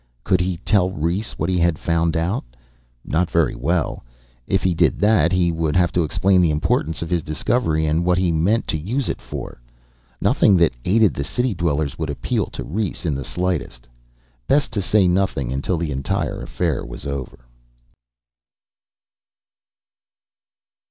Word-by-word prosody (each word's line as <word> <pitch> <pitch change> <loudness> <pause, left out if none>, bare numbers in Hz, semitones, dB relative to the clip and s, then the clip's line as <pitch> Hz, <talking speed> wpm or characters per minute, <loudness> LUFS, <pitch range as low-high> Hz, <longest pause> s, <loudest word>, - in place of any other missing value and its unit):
Could - - +2
he 90 -1 -1
tell 95 0 +2
Rhes 90 +4 -2
what 80 - -2
he 90 -1 +1
had 85 -2 +2
found 85 0 0
out? 85 +6 -1 0.6
Not 85 +2 0
very 85 -6 +2
well. 80 +5 -1 0.4
If 95 - +1
he 90 - +2
did 80 - +2
that, 100 -6 +3
he 90 -2 +2
would 80 -2 -1
have 90 -1 +3
to 90 - +1
explain 90 +5 +2
the 85 - +3
importance 75 +1 0
of 85 - -6
his 85 -2 +1
discovery 80 0 0
and 80 +2 +1
what 90 0 +2
he 90 -2 +2
meant 90 +9 +1
to 80 - -1
use 120 - -2
it - - -3
for. - - -8 0.6
Nothing 100 - +4
that 85 -5 +3
aided 105 +2 +4
the 70 - -3
city 125 - -1
dwellers 75 -5 -1
would - - -2
appeal 70 -4 -1
to - - -7
Rhes 100 +1 -3
in 80 - +1
the 70 0 -3
slightest. 85 -9 -3 0.6
Best 145 0 +2
to 105 - -1
say 95 +1 +3
nothing 90 -9 0
until 70 +6 -1
the 80 -2 -2
entire 70 -1 -2
affair - - -2
was - - -9
over. 70 -3 -6
85 Hz, 165 wpm, -21 LUFS, 75-95 Hz, 0.6 s, Nothing